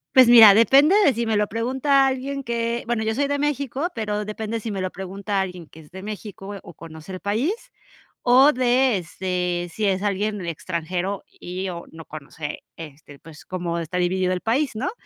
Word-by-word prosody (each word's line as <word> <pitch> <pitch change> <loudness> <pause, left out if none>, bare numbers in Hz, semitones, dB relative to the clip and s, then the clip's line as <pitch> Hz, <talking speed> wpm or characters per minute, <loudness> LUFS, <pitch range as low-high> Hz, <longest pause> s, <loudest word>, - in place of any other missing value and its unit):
Pues 255 -2 +8
mira, 225 -4 +10
depende 275 - +5
de 285 - +5
si 235 0 -2
me 220 -2 +1
lo 210 0 +1
pregunta 265 +5 +2
alguien 270 +1 -2
que 235 0 -2
bueno, 235 -1 -1
yo 220 0 -1
soy 285 - +1
de 285 0 -1
México, 285 +1 -1
pero 210 -2 -2
depende 220 +2 -4
si 225 - -6
me 200 -2 -4
lo 185 0 -2
pregunta 195 +2 -3
alguien 180 -3 -6
que 155 - -17
es 150 - -16
de 190 +2 -10
México 205 -1 -7
o 175 - -13
conoce 160 +3 -10
el 185 - -6
país, 220 - 0 0.7
o 260 +4 +6
de, 250 -1 +2
este, 180 0 -3
si 215 - -2
es 195 +1 0
alguien 205 -1 -1
extranjero 175 +3 -3
y 185 +2 -6
o 170 -1 -7
no 160 0 -11
conoce, 150 0 -7 0.2
este, 145 -2 -11
pues, 160 +1 -14
cómo 175 -2 -3
está 170 +2 -4
dividido 185 +1 +1
el 180 - -3
país, 260 +3 0
¿no? 255 +11 -2
205 Hz, 195 wpm, -23 LUFS, 180-240 Hz, 0.7 s, mira